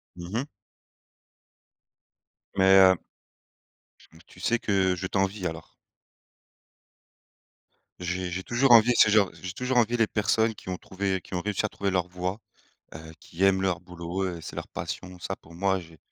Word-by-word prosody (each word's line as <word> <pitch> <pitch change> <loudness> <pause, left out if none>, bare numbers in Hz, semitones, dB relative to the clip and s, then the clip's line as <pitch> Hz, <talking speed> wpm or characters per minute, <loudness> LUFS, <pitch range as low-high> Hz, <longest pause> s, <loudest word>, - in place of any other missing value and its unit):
Mmh 85 0 -8
mh. 135 +6 -2 2.1
Mais, 95 0 +6
heu 95 -1 +7 1.0
j - - -20
mmh, 80 - -17
tu - - -18
sais 120 +4 +1
que 95 -3 +2
je 95 +2 -4
t'envie 95 0 -1
alors. 80 0 -9 2.3
J'ai 90 0 -3
j'ai 95 +2 -4
toujours 120 +2 +2
envié 120 +1 +7
ce 105 - +7
genre 105 -2 +4
j'ai 90 -1 -5
toujours 125 +6 -3
envié 120 +1 +3
les 115 -2 +3
personnes 110 +1 +1
qui 95 - -11
ont 90 - -3
trouvé 95 0 -2
qui - - -14
ont 90 - -1
réussi 105 +1 -1
à - - -2
trouver 100 -1 -2
leur 90 -1 0
voie, 90 +3 -4 0.6
heu, 80 0 -9
qui 90 +3 -5
aiment 95 -1 +4
leur 95 -3 0
boulot, 90 +1 -5
heu, 90 -3 -4
c'est - - -8
leur - - -6
passion. 90 -1 -6
Ça 95 - -4
pour 80 - -18
moi 95 +2 0
j'ai 80 -1 -15
95 Hz, 170 wpm, -27 LUFS, 90-105 Hz, 2.3 s, heu